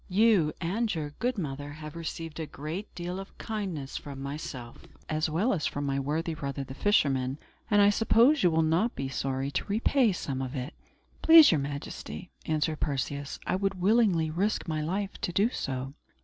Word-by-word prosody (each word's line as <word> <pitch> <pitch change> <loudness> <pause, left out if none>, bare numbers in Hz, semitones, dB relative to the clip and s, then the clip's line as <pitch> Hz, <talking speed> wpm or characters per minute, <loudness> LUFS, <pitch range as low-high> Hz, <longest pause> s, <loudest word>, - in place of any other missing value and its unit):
You 195 -5 +4
and 210 +6 0
your 150 -2 -3
good 245 0 0
mother 145 -4 -4
have 155 0 -9
received 165 -1 -5
a 160 - -3
great 160 +10 -6
deal 175 +2 -4
of 195 - -10
kindness 190 -11 -4
from 140 -2 -8
myself, 135 -3 -6 0.2
as 155 +1 0
well 185 +11 +1
as 165 -6 0
from 145 0 -3
my 140 0 0
worthy 155 +4 -1
brother 140 -2 -4
the 135 - -8
fisherman, 135 -7 +2 0.3
and 205 -2 +5
I 200 - +6
suppose 235 +7 +4
you 180 - +5
would 160 -1 +2
not 175 +10 +1
be 135 -1 -3
sorry 135 +1 -2
to - - -2
repay 230 +3 +2
some 135 -7 -3
of 130 +1 -4
it." 130 +5 -4 0.5
"Please, 325 -1 +9
Your 160 - +3
Majesty," 145 +5 -6 0.2
answered 155 0 0
Perseus, 140 0 -2
"I - - 0
would 195 0 -1
willingly 190 -5 +3
risk 195 +6 0
my 155 -2 -1
life 190 +5 -3
to - - -1
do 205 +7 +2
so." 135 - -4
160 Hz, 185 wpm, -29 LUFS, 140-200 Hz, 0.5 s, Please